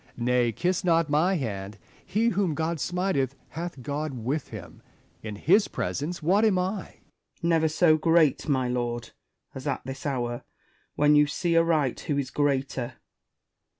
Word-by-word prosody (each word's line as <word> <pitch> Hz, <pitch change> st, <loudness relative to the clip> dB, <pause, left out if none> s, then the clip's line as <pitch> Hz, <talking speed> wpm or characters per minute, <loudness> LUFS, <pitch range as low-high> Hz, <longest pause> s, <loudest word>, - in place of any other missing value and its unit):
Nay, 120 Hz, 0 st, +2 dB
kiss 180 Hz, -, -1 dB
not 165 Hz, -3 st, +2 dB
my 170 Hz, +6 st, +3 dB
hand: 105 Hz, -, -4 dB, 0.3 s
he 225 Hz, +3 st, +1 dB
whom 185 Hz, -6 st, 0 dB
God 160 Hz, +1 st, -1 dB
smiteth 175 Hz, -7 st, -1 dB
hath 165 Hz, -5 st, -6 dB
God 145 Hz, +2 st, -3 dB
with 130 Hz, +5 st, -2 dB
him. -, -, -10 dB, 0.4 s
In 105 Hz, -1 st, -6 dB
his 185 Hz, -, +3 dB
presence 160 Hz, +4 st, -3 dB
what 195 Hz, +7 st, +3 dB
am 215 Hz, -4 st, +4 dB
1 185 Hz, +2 st, 0 dB
1 200 Hz, -, -4 dB
Spenser. -, -, -20 dB, 0.4 s
Never 165 Hz, -1 st, +3 dB
so 155 Hz, 0 st, +4 dB
great, 165 Hz, -2 st, +3 dB
my 130 Hz, -3 st, +2 dB
lord, 120 Hz, -1 st, -3 dB, 0.4 s
as 130 Hz, -, -7 dB
at -, -, -2 dB
this 135 Hz, +2 st, -5 dB
hour, 120 Hz, -3 st, -2 dB, 0.5 s
when 150 Hz, 0 st, +4 dB
you 150 Hz, 0 st, +5 dB
see 170 Hz, +3 st, -1 dB
aright 160 Hz, -6 st, +2 dB
who 145 Hz, -, -2 dB
is 135 Hz, -2 st, -2 dB
greater. 135 Hz, -3 st, -1 dB
150 Hz, 160 wpm, -26 LUFS, 130-170 Hz, 0.5 s, you